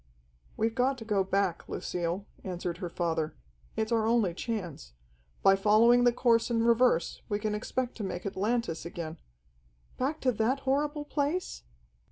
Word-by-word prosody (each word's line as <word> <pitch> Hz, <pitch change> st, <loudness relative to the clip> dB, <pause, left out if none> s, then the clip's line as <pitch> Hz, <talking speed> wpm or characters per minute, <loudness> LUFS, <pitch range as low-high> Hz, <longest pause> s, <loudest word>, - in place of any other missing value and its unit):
"We've 225 Hz, +1 st, +1 dB
got 260 Hz, +3 st, +1 dB
to 225 Hz, -, -9 dB
go 205 Hz, -3 st, +2 dB
back, 190 Hz, -2 st, -1 dB
Lucille," 175 Hz, +3 st, -3 dB, 0.2 s
answered 175 Hz, -2 st, -4 dB
her 180 Hz, -3 st, -4 dB
father. 165 Hz, -2 st, -1 dB, 0.4 s
"It's 220 Hz, +1 st, -1 dB
our 225 Hz, -1 st, +2 dB
only 225 Hz, -6 st, +2 dB
chance. 175 Hz, -, -5 dB, 0.5 s
By 195 Hz, -, +7 dB
following 225 Hz, +5 st, +5 dB
the 245 Hz, -, +6 dB
course 235 Hz, -1 st, +2 dB
in 230 Hz, -1 st, +1 dB
reverse 235 Hz, -7 st, +3 dB
we 205 Hz, -, +1 dB
can 210 Hz, 0 st, -2 dB
expect 245 Hz, +4 st, -3 dB
to 220 Hz, -, -4 dB
make 180 Hz, -2 st, -4 dB
Atlantis 200 Hz, -2 st, -1 dB
again 170 Hz, -1 st, -6 dB, 0.4 s
" -, -, -34 dB
"Back 285 Hz, +5 st, -1 dB
to 255 Hz, -, +3 dB
that 245 Hz, +5 st, 0 dB
horrible 290 Hz, +2 st, 0 dB
place?" 295 Hz, -, -2 dB
215 Hz, 160 wpm, -29 LUFS, 175-245 Hz, 0.5 s, By